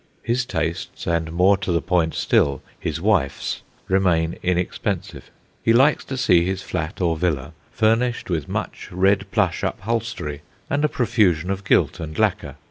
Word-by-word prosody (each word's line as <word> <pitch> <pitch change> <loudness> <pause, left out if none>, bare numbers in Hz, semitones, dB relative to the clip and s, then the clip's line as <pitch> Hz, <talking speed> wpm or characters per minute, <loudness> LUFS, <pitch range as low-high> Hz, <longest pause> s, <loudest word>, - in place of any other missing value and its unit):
His 120 +1 0
tastes, 85 0 -3
and, 85 -1 0
more 95 +4 +4
to 95 -1 -3
the 85 - +2
point 85 -4 0
still, 70 -1 +2 0.2
his - - -3
wife's, 90 -8 0 0.3
remain 90 -4 +2
inexpensive. 90 0 -2 0.3
He 115 - +3
likes 135 +5 +4
to 130 - -5
see 90 -8 +4
his 95 +1 -2
flat 80 -4 -4
or 85 -2 +2
villa 80 -3 -1 0.2
furnished 115 +2 +1
with 80 -6 -2
much - - -4
red 95 +2 +2
plush 95 -5 +1
upholstery 110 -9 -3 0.3
and 145 +1 +1
a 150 - +3
profusion 100 - +1
of 95 0 -3
gilt - - +2
and 80 -1 -6
lacquer. - - 0
90 Hz, 155 wpm, -22 LUFS, 80-110 Hz, 0.3 s, more